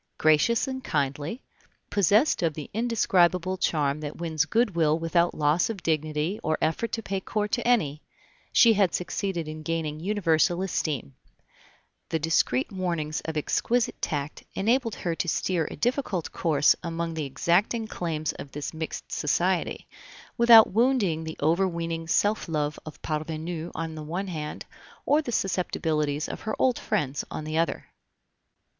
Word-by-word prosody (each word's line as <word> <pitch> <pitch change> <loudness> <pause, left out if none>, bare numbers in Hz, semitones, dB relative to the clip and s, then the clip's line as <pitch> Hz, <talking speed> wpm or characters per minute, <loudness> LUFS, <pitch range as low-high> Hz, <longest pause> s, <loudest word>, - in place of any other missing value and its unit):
Gracious 155 - +3
and 260 -1 -5
kindly, 145 - -2 0.5
possessed 205 - +3
of 165 -3 0
the 150 - -7
indescribable 185 -5 +2
charm 150 -5 0
that 150 -1 -6
wins 160 -2 0
good 225 +1 +1
will 160 -2 +3
without 170 +1 +1
loss 150 +6 +2
of 210 -5 -5
dignity 155 +4 -1
or 155 - 0
effort 165 +9 -1
to 225 - -3
pay 195 -1 -2
court 210 +2 -2
to 240 -1 0
any, 155 -12 +2 0.5
she 230 -1 +6
had 195 -4 +2
succeeded 180 -2 -2
in 155 0 -6
gaining 155 -1 -2
universal 175 -2 +1
esteem; 150 - -2 1.0
the 160 - +1
discreet 160 -5 +1
warnings 170 -5 -2
of 160 -1 -3
exquisite 235 +10 0
tact 145 0 -3
enabled 230 +2 +1
her 170 - -2
to 170 - -3
steer 170 -1 0
a - - -7
difficult 235 - -1
course 150 -3 +3
among 170 0 -3
the 155 -2 -3
exacting 190 - +1
claims 160 -7 -3
of 140 - -10
this 145 +2 -5
mixed 160 0 -6
society, - - 0 0.5
without 230 -4 +8
wounding 220 -9 +2
the 160 - -6
overweening 165 -1 0
self 205 +3 +1
love 150 -1 -1
of 155 - -9
parvenus 160 +2 -3
on 165 0 -4
the 155 - -7
one 175 +6 -4
hand, 150 -3 -5 0.4
or 300 +2 +4
the 255 - -5
susceptibilities 155 -7 -1
of - - -6
her 220 - -3
old 255 -2 +2
friends 140 -1 -1
on - - -5
the 155 +1 -4
other. 165 +1 0
165 Hz, 150 wpm, -26 LUFS, 155-200 Hz, 1.0 s, without